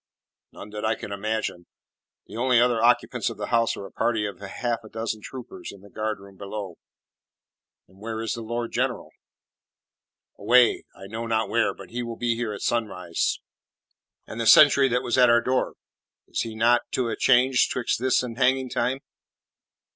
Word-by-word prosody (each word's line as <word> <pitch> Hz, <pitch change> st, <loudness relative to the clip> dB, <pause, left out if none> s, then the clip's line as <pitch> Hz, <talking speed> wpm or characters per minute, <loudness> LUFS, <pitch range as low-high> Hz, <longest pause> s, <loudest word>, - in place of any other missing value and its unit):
"None 105 Hz, -, -11 dB
that 105 Hz, 0 st, -6 dB
I 110 Hz, +1 st, +1 dB
can -, -, -8 dB
imagine. 100 Hz, -3 st, -3 dB, 0.6 s
The -, -, -12 dB
only 125 Hz, +1 st, +3 dB
other 120 Hz, -2 st, +3 dB
occupants 120 Hz, +1 st, +2 dB
of -, -, -8 dB
the -, -, -5 dB
house 115 Hz, -1 st, +2 dB
are 100 Hz, -, -7 dB
a -, -, -11 dB
party 110 Hz, -2 st, 0 dB
of 100 Hz, -, -6 dB
half 115 Hz, +4 st, -3 dB
a 110 Hz, -, -12 dB
dozen 110 Hz, -1 st, -4 dB
troopers 125 Hz, +2 st, -8 dB
in 100 Hz, -, -14 dB
the 100 Hz, -, -16 dB
guardroom 100 Hz, -3 st, -5 dB
below." 100 Hz, -3 st, -6 dB, 1.1 s
"Where 110 Hz, +4 st, -7 dB
is 115 Hz, -, -2 dB
the 115 Hz, -, -5 dB
Lord 120 Hz, +1 st, -4 dB
General?" -, -, -2 dB, 1.3 s
"Away 125 Hz, -1 st, +4 dB
I 95 Hz, -, -11 dB
know 110 Hz, +4 st, -5 dB
not 110 Hz, -1 st, 0 dB
where. -, -, +1 dB
But -, -, -12 dB
he 120 Hz, +1 st, -3 dB
will 115 Hz, -1 st, -5 dB
be 120 Hz, -1 st, 0 dB
here 115 Hz, -2 st, -3 dB
at 105 Hz, -, -7 dB
sunrise." 90 Hz, -7 st, -1 dB, 0.9 s
"And 115 Hz, -, -6 dB
the 115 Hz, -, -1 dB
sentry 140 Hz, 0 st, +8 dB
that 125 Hz, 0 st, 0 dB
was 120 Hz, +2 st, +1 dB
at 125 Hz, -1 st, +7 dB
our 120 Hz, 0 st, +6 dB
door 130 Hz, +2 st, -1 dB, 0.5 s
is -, -, -2 dB
he 115 Hz, -1 st, -5 dB
not 120 Hz, +2 st, +4 dB
to 125 Hz, -2 st, 0 dB
a -, -, -2 dB
changed 130 Hz, 0 st, +3 dB
'twixt 125 Hz, -3 st, -1 dB
this 130 Hz, 0 st, +2 dB
and 120 Hz, 0 st, -6 dB
hanging 130 Hz, 0 st, +2 dB
time?" 135 Hz, +2 st, -1 dB
115 Hz, 180 wpm, -25 LUFS, 105-120 Hz, 1.3 s, sentry